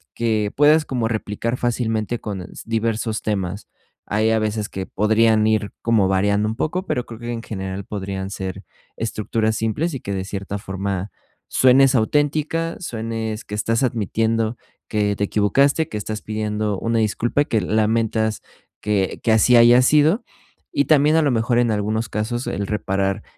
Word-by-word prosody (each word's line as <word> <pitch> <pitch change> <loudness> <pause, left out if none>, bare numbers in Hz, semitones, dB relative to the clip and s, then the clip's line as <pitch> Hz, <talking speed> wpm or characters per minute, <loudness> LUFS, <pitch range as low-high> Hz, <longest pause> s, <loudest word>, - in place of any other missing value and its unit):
que 110 -3 0
puedas 150 +2 +5
como 125 -5 -1
replicar 115 +2 -2
fácilmente 115 -2 -1
con 100 -3 -5
s 90 - -10
diversos 115 -1 -1
temas. 100 -1 -3 0.4
Hay 110 +2 +1
a 110 - +2
veces 105 -1 -2
que 95 0 -5
podrían 110 +1 +3
ir 110 -1 +1
como 110 -4 +3
variando 100 +2 +2
un 110 - -3
poco, 175 +8 -2
pero 125 - -2
creo 115 -1 -10
que 120 0 -5
en 115 - -4
general 95 -2 -5
podrían 95 -2 -4
ser 95 -2 -5 0.3
estructuras 110 0 -1
simples 140 +10 -1
y 130 - -5
que 100 - -5
de 95 -1 -3
cierta 100 +1 -5
forma 95 0 -4 0.4
suenes 130 +1 +5
auténtica, 150 +7 0
suenes 115 -6 -4
que 105 - -6
estás 115 +4 0
admitiendo 115 0 0 0.3
que 105 -1 0
te 100 - -2
equivocaste, 140 - +2
que 105 - -5
estás 110 +1 -4
pidiendo 105 -1 -2
una 115 0 0
disculpa, 120 +6 +1
que 110 -7 0
lamentas 110 +2 0 0.4
que 100 -3 0
que 115 - +2
así 110 +3 +5
haya 120 +2 +7
sido 150 - +4 0.5
y 285 -1 +2
también 150 0 +4
a 160 - +5
lo 145 -4 +2
mejor 120 +1 +1
en 120 -2 +2
algunos 110 +1 -1
casos 115 +4 -3
el 100 -1 -2
reparar, 95 -2 -1
110 Hz, 165 wpm, -21 LUFS, 105-120 Hz, 0.5 s, haya